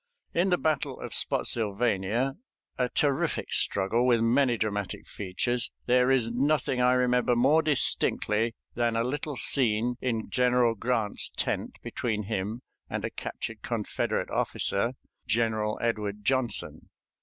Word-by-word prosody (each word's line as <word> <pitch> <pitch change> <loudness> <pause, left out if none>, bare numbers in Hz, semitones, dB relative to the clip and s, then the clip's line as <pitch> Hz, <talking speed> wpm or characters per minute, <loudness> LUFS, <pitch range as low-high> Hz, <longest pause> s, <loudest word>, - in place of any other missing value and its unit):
In 180 +3 +2
the 180 - +3
battle 155 -4 -1
of - - -6
Spottsylvania, 115 +3 +1 0.4
a 125 -1 0
terrific 140 0 0
struggle, 100 +5 +2
with 120 -2 +4
many 120 +1 +3
dramatic 105 -2 -3
features, 115 +5 -1 0.2
there 125 +1 +3
is 125 -4 +2
nothing 135 0 +1
I 125 0 +4
remember 125 -1 +2
more 140 +7 +4
distinctly 115 -6 +1 0.2
than 120 -1 0
a 115 - +1
little 145 +2 -3
scene 120 -2 +3
in 115 -3 -2
General 125 -2 +3
Grant's 115 -1 0
tent - - -2
between 110 -3 -2
him 105 +3 -3 0.3
and - - -3
a - - -4
captured - - -6
Confederate - - -2
officer, 115 +6 0 0.3
General 110 -1 0
Edward 105 -3 -2
Johnson. 130 -1 -1
120 Hz, 130 wpm, -28 LUFS, 110-125 Hz, 0.4 s, with